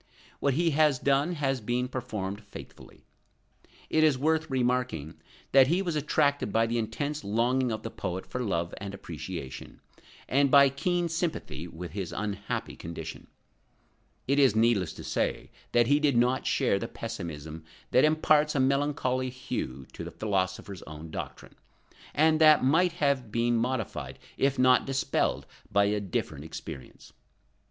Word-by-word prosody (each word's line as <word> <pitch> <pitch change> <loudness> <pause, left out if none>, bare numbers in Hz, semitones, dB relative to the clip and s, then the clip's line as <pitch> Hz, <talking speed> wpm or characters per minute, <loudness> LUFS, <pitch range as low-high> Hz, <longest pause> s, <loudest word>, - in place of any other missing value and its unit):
What 140 -2 +1
he 165 +1 +2
has 150 -2 +3
done, 140 +6 +1
has 135 -5 -1
been 120 +3 -1
performed 105 -6 -4
faithfully. 100 - -13 0.8
It 155 - +2
is 150 -4 +4
worth 160 +3 +1
remarking 125 - -1 0.3
that 135 -1 +7
he 175 +6 +1
was 170 -4 -2
attracted 145 -4 +1
by 115 +2 +3
the 115 +1 -1
intense 145 +7 -3
longing 120 +4 +1
of 110 -1 -4
the 115 - -5
poet 90 +1 -4
for 125 - -4
love 85 -7 -1
and 100 -1 -6
appreciation, 85 -5 -7 0.5
and 140 +1 +3
by 140 0 +7
keen 175 +5 0
sympathy 165 - -3
with 85 +1 -8
his 95 -4 -4
unhappy 100 +1 -4
condition. 80 -1 -8 1.0
It 140 +2 +2
is 135 -6 +5
needless 110 -7 +3
to - - -10
say - - -2 0.2
that 120 0 +4
he 145 +4 +3
did 145 -5 +2
not 125 +2 +2
share 125 -8 +2
the 115 - -4
pessimism 80 -10 -7 0.3
that 130 - +5
imparts 155 -1 +3
a - - +2
melancholy 130 -1 +1
hue 70 - -5
to - - -7
the - - -6
philosopher's 95 -2 -2
own 80 +1 -9
doctrine, - - -7 0.6
and 155 +1 +4
that 155 -3 +7
might 165 +6 +3
have 140 -8 0
been 120 +1 +1
modified 110 - -2 0.2
if 135 0 +1
not 130 +1 +4
dispelled 135 0 0 0.3
by 100 0 +4
a 105 +1 +1
different 80 -6 -3
experience. 80 -3 -9
125 Hz, 150 wpm, -28 LUFS, 100-140 Hz, 1.0 s, that